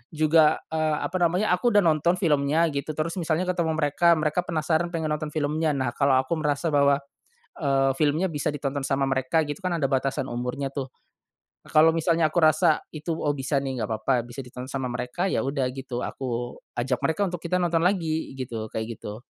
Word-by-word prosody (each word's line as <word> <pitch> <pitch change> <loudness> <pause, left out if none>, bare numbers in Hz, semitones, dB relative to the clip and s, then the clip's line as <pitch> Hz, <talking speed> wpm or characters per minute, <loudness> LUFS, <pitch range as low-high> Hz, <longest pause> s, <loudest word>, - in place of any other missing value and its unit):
juga, 155 0 +4
eee, 155 -1 +1
apa 185 - -2
namanya 180 +4 +2
aku 210 +5 +2
udah 205 - +6
nonton 165 +1 +3
filmnya 160 -2 +2
gitu 140 +2 -4
terus 165 +4 -2
misalnya 165 +1 0
ketemu 165 -3 -1
mereka 160 +3 +3
mereka 155 +1 0
penasaran 160 +1 0
pengen 160 -2 -1
nonton 150 0 -2
filmnya 155 0 0
nah 130 -3 -1
kalau 140 +1 +2
aku 130 +5 +1
merasa 150 +2 0
bahwa, 140 -1 +3 0.6
eee, 135 -2 +2
filmnya 160 +4 +2
bisa 150 -1 -1
ditonton 140 -1 -2
sama 135 0 +1
mereka 135 +4 +1
gitu 145 +6 -5
kan 180 -2 -1
ada 160 - -1
batasan 135 0 0
umurnya 125 +3 -3
tuh. 135 -2 -4 0.8
Kalau 155 +1 +6
misalnya 165 -1 +2
aku - - -1
rasa 155 +1 +4
itu, 155 +2 -3
"Oh 145 -1 0
bisa 135 +1 0
nih 130 -3 -3
nggak 110 - -3
papa 135 +4 +1
bisa 120 +3 -8
ditonton 125 +1 -8
sama 130 -1 -3
mereka," 125 +8 -2
ya - - 0
udah 135 -1 0
gitu, 130 -2 -5
aku 120 -2 -4 0.2
ajak 125 0 0
mereka 160 +5 0
untuk 175 -1 -6
kita 180 +1 0
nonton 170 -1 +1
lagi, 165 -4 0
gitu 120 -4 -4
kayak 110 +1 -4
gitu. 105 +2 -8
150 Hz, 190 wpm, -25 LUFS, 135-165 Hz, 0.8 s, udah